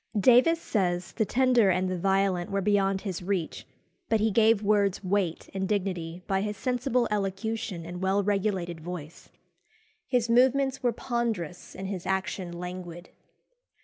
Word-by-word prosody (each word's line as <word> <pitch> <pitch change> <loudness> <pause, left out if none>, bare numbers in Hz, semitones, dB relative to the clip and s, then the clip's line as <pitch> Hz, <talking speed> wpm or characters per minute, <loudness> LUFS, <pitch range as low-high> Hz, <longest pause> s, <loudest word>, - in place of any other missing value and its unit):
Davies 255 - +5
says, 180 - -1
the 220 - 0
tender 245 -3 +3
and 185 0 +1
the 185 - -1
violent 190 -1 +1
were 195 - 0
beyond 195 -1 +1
his 190 -4 -4
reach, 180 -3 -3 0.4
but 225 - +3
he 220 +1 +2
gave 220 0 +4
words 200 -2 +2
weight 185 -3 -1
and 190 -1 -2
dignity 180 -4 -2
by 195 0 0
his 210 0 -3
sensible 250 -1 0
elocution 200 -2 -2
and 175 +1 -7
well 195 +2 +2
regulated 190 -4 -1
voice. 170 -2 -8 0.8
His 245 -3 +1
movements 260 +3 +3
were 245 -2 +2
ponderous 225 - -3
and 190 - -6
his 185 -2 -5
action 190 -1 -2
languid. 175 0 -7
195 Hz, 145 wpm, -27 LUFS, 180-225 Hz, 0.8 s, Davies